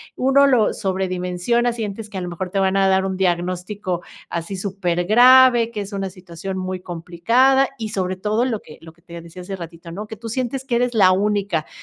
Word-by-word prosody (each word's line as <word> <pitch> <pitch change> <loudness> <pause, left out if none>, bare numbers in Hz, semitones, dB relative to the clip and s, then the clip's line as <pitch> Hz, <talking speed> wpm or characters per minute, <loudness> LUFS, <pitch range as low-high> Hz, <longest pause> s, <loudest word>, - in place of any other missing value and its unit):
uno 275 +2 +4
lo 245 -6 +3
sobredimensiona, 190 +5 -1
sientes 215 -2 -5
que 195 - -7
a - - -3
lo 180 - -4
mejor 180 +2 -5
te 195 - -4
van 190 0 +2
a 195 0 +3
dar 190 0 +2
un 190 -1 -3
diagnóstico 180 +1 -2 0.3
así 170 +3 -4
supergrave, 215 +7 +4
que 215 -3 -5
es 200 +1 -8
una 195 -1 -3
situación 185 +1 -7
muy 185 0 -4
complicada 230 +11 +2
y 220 -2 -4
sobre 185 -3 -2
todo 215 +5 0
lo 225 -5 -2
que 150 - -14
lo 165 0 -13
que 170 - -30
te 170 -1 -10
decía 170 +2 -11
hace 195 +1 -5
ratito 170 -1 -10
¿no?, 205 +5 -6
que 220 - -8
tú 230 +2 -9
sientes 255 +3 -3
que 250 -3 -1
eres 245 0 0
la 190 -4 +6
única, 200 -4 0
195 Hz, 210 wpm, -21 LUFS, 180-225 Hz, 0.3 s, la